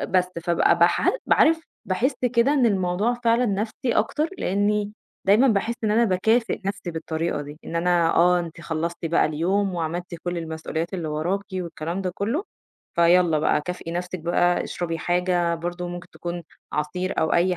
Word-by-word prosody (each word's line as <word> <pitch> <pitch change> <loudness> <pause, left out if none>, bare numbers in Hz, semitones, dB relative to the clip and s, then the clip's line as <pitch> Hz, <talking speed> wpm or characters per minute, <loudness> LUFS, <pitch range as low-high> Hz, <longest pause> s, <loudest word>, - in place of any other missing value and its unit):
آآ - - -1
بس، 180 -1 +1
فابقى 170 0 +3
باحال - - +4
ب - - +2
عارف، 325 +1 +5 0.2
باحس 250 +9 0 0.2
كده 235 +5 +4
إن 265 -5 +3
الموضوع 195 +3 +1
فعلًا 235 +2 +3
نَفْسي 215 +5 -1
أكتر 300 +10 +1
لإنّي 205 +2 0 0.3
دايمًا 215 +7 +5
باحس 225 +2 +1
إن 210 - +2
أنا 230 +2 +4
باكافئ 220 +4 +1
نَفْسي 195 -2 -3
بالطريقة 160 -1 -2
دي، 145 +2 -10
إن 170 - -4
أنا 170 -1 +3
آه، 180 +1 +5
أنتِ 170 -1 -6
خلصتِ 170 +1 -3
بقى 165 - +3
اليوم 180 +6 0
وعملتِ 175 +2 -3
كل 175 -1 -2
المسئوليات 160 +2 -4
اللي 165 -4 -3
وراكِ 175 +7 -1
والكلام 170 0 -4
ده 185 - -1
كُلّه، 235 - -1 0.5
فيالّا 170 -2 +4
بقى 150 - +2
كافئي 175 0 -6
نَفْسِك 180 +1 -3
بقى، 175 +1 +2
اشربي 165 -2 -3
حاجة 175 -1 +1
برضه 175 +1 -4
ممكن 175 0 -7
تكون 175 0 -5 0.3
عصير 180 +5 -2
أو 160 - +1
أي 180 +1 +3
180 Hz, 170 wpm, -24 LUFS, 170-200 Hz, 0.5 s, عارف